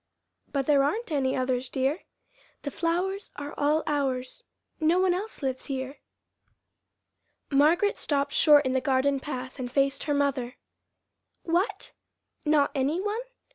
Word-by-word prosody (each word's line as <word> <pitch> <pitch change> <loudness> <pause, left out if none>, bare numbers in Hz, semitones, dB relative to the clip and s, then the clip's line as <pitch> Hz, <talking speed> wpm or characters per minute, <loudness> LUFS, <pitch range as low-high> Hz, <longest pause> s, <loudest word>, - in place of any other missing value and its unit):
"But 275 -2 0
there 285 -1 +4
aren't 400 +8 -1
any 270 -3 +1
others, 255 -1 -1
dear. 270 +5 0 0.6
The 285 - -3
flowers 360 +6 -1
are 290 0 -6
all 300 +2 +2
ours. 270 - -2 0.4
No 320 +2 +3
one 370 -1 +3
else 390 -3 -5
lives 260 -1 -2
here." 265 0 -4 1.5
Margaret 320 +9 +3
stopped 285 -1 0
short 295 -2 +6
in 260 - 0
the 260 - +1
garden 270 +1 +2
path 260 -1 -6
and 245 -1 -4
faced 275 0 +1
her 290 - +1
mother. 275 -3 0 0.9
"What, 385 +4 -1 0.5
not 300 -2 +3
any 280 +5 0
one? 415 +4 -2
285 Hz, 135 wpm, -27 LUFS, 265-330 Hz, 1.5 s, short